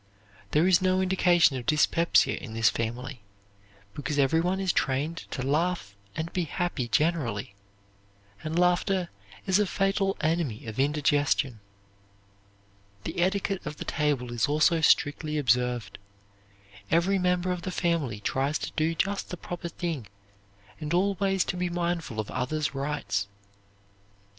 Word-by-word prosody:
There 155 +3 +3
is 185 -1 +5
no 185 0 +2
indication 180 -6 +4
of 120 - -7
dyspepsia 165 +2 +3
in 110 -2 -8
this 115 -1 +4
family, 120 +2 -4 0.7
because 145 +3 -3
every 145 +4 +3
one 180 +3 0
is 190 -3 +1
trained 140 +5 0
to 130 - -4
laugh 150 - 0 0.2
and 160 +1 -4
be 180 -2 0
happy 165 -5 -2
generally, 120 -9 0 0.9
and 160 +1 -3
laughter 180 +1 +2 0.4
is 190 +1 +3
a 210 - +2
fatal 195 0 0
enemy 155 -8 -1
of 110 +2 -6
indigestion. 145 -3 +1 1.4
The - - -4
etiquette 195 +1 0
of 150 0 -6
the - - -6
table 140 -5 -1
is 120 +2 +1
also 155 +3 +3
strictly 150 0 +2
observed. 125 -5 0 0.9
Every 180 +4 +3
member 180 0 +1
of 180 -1 -3
the 185 - -4
family 165 - -1
tries 135 +7 0
to - - -5
do 160 +2 0
just 195 +4 -1
the 180 - -5
proper 175 0 -6
thing 160 - -4 0.7
and 155 +1 -2
always 195 0 +2
to - - -2
be 180 0 -1
mindful 170 -8 -2
of 105 - -3
others' 140 +4 -1
rights. 135 -8 -2
155 Hz, 140 wpm, -27 LUFS, 135-180 Hz, 1.4 s, is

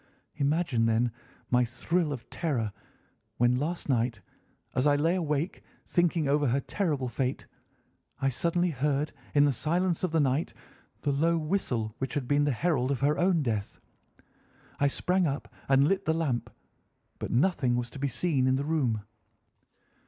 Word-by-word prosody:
Imagine, 140 -5 +1
then, 115 +2 +2 0.4
my 125 0 +4
thrill 150 +7 -1
of 130 -5 -6
terror 120 - -1 0.6
when 120 +1 +3
last 170 +5 -3
night, 120 -4 +1 0.5
as 130 +3 +2
I 145 - +5
lay 160 +4 +2
awake, 160 -1 -1 0.2
thinking 170 -4 +1
over 145 +1 +2
her 130 +3 +2
terrible 150 -6 -1
fate, 130 +1 -2 0.7
I 135 - +2
suddenly 170 +6 0
heard 145 +1 0 0.2
in 145 0 +6
the 145 - +2
silence 170 +7 0
of 180 - 0
the 165 - +2
night 140 +2 +1 0.5
the 145 - +1
low 165 +4 +2
whistle 150 - -1
which 130 +1 -3
had 135 -4 -2
been 145 +1 +3
the 145 - +2
herald 135 -1 +1
of 140 -2 -1
her 145 +2 +2
own 175 -3 +3
death. 110 -5 -3 1.0
I 140 - +4
sprang 180 +5 +1
up 140 0 -4 0.2
and 135 +1 +5
lit 195 +2 0
the 160 - +2
lamp, 125 -8 -1 0.7
but - - -4
nothing 130 -3 +2
was 120 -1 -2
to - - -9
be 140 - 0
seen 135 +1 +1
in 130 - +3
the 140 +1 -1
room. 130 -9 0
145 Hz, 165 wpm, -29 LUFS, 125-165 Hz, 1.0 s, in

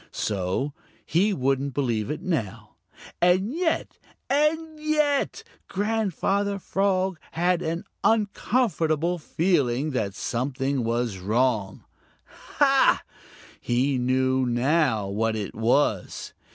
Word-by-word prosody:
So 105 +8 -2 0.3
he 190 +7 +2
wouldn't 135 -3 0
believe 120 -6 0
it 155 +3 -4
now. 150 - -3 0.5
And 185 +6 +3
yet 335 0 -1 0.3
and 310 +2 +1
yet 305 +5 +1 0.2
Grandfather 200 -1 0
Frog 190 -2 0
had 175 +1 +1
an 165 +1 -2 0.2
uncomfortable 195 - +1
feeling 150 -5 +1
that 105 -7 -2
something 130 +3 -2
was 115 -3 -1
wrong. 110 0 0 0.7
Ha! - - +4 0.6
he 130 +2 +1
knew 130 +1 +1
now 120 -3 +1
what 110 +3 0
it 105 -2 -4
was! 110 -3 0
145 Hz, 100 wpm, -25 LUFS, 120-195 Hz, 0.7 s, Ha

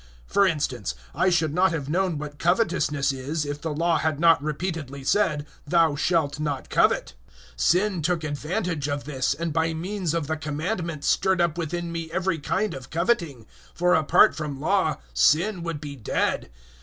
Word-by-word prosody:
For 200 - +3
instance, 130 - -2 0.2
I 185 - +2
should 160 -4 +1
not 185 +3 +3
have 145 -4 -3
known 175 +1 0
what 145 0 -7
covetousness 170 -6 +1
is, 140 +4 -3
if 145 0 -5
the 160 - -3
Law 165 +2 +1
had 155 -2 -1
not 165 -2 +5
repeatedly 150 -3 -4
said, 150 -2 +1 0.2
"Thou 165 -1 +3
shalt 150 -2 0
not 145 -3 -3
covet." - - +2 0.4
007:008 - - -19
Sin 185 - +2
took 170 +1 0
advantage 155 +1 -2
of 145 0 -2
this, 135 -2 -1
and 165 +1 -3
by 160 0 0
means 180 0 -2
of 165 -3 -1
the 160 +2 -2
Commandment 155 +1 -3
stirred 190 +4 +2
up 170 -2 +2
within 170 +1 -3
me 165 -1 -4
every 185 0 -1
kind 200 +8 -1
of 130 -1 -9
coveting; 170 - -1 0.3
for 180 +1 +3
apart 155 -3 +5
from 150 -3 -5
Law 160 0 +1 0.2
sin 170 - +3
would 165 -3 -4
be 145 -1 -7
dead. 115 -7 -1
160 Hz, 175 wpm, -25 LUFS, 145-175 Hz, 0.4 s, not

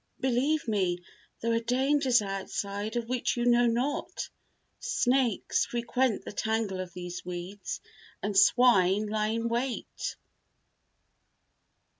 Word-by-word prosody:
"Believe 265 +3 +1
me, 185 -5 0 0.4
there 230 0 +1
are 230 - +3
dangers 255 0 +2
outside 200 +2 -3
of 235 -1 -1
which 250 0 -1
you 240 - 0
know 240 0 +5
not. 250 +5 -1 0.5
Snakes 260 - +1
frequent 240 0 0
the - - -5
tangle 220 -2 -1
of 185 -1 -5
these 180 0 -6
weeds 180 +3 -5 0.4
and 205 0 -1
swine 200 -2 +5
lie 215 0 0
in 230 +1 -1
wait." 240 +2 -3
230 Hz, 115 wpm, -29 LUFS, 200-245 Hz, 0.5 s, know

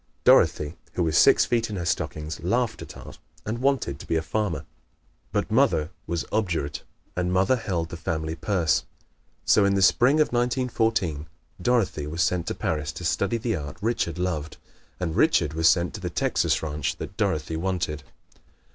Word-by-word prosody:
Dorothy, 75 +2 +4 0.2
who 90 - 0
was 80 -2 0
six - - +6
feet 115 -2 0
in 105 - -4
her 85 -3 -3
stockings, 80 -1 -2
laughed 115 +6 0
at - - -9
art - - -11 0.3
and 110 +2 -3
wanted 130 - 0
to - - -10
be - - 0
a 80 - +1
farmer. 100 0 -2 0.7
But - - -1
mother 75 +2 +2 0.2
was 85 -1 -2
obdurate 85 -9 -1 0.3
and 90 0 -1
mother 95 +8 +3
held 90 -8 -2
the 85 - -7
family 80 -1 -3
purse. 80 -3 +1 0.6
So, 105 - +5
in 100 0 +3
the 100 - +1
spring 125 +8 +5
of 150 - +2
1914, 115 - 0 0.3
Dorothy 95 -9 +1
was 85 +2 0
sent 85 +1 0
to - - -2
Paris 75 -1 -2
to 90 +3 -7
study 100 +6 +1
the 115 -1 -1
art 75 -4 -6
Richard 105 -6 -1
loved, 80 -4 -3 0.4
and 85 -3 -2
Richard 75 - +3
was 80 +1 +4
sent 85 +2 +2
to 110 - -7
the 90 - -3
Texas 85 - 0
ranch 75 -1 -2
that - - -8
Dorothy 75 +1 -1
wanted. 85 -3 -2
90 Hz, 175 wpm, -25 LUFS, 80-110 Hz, 0.7 s, six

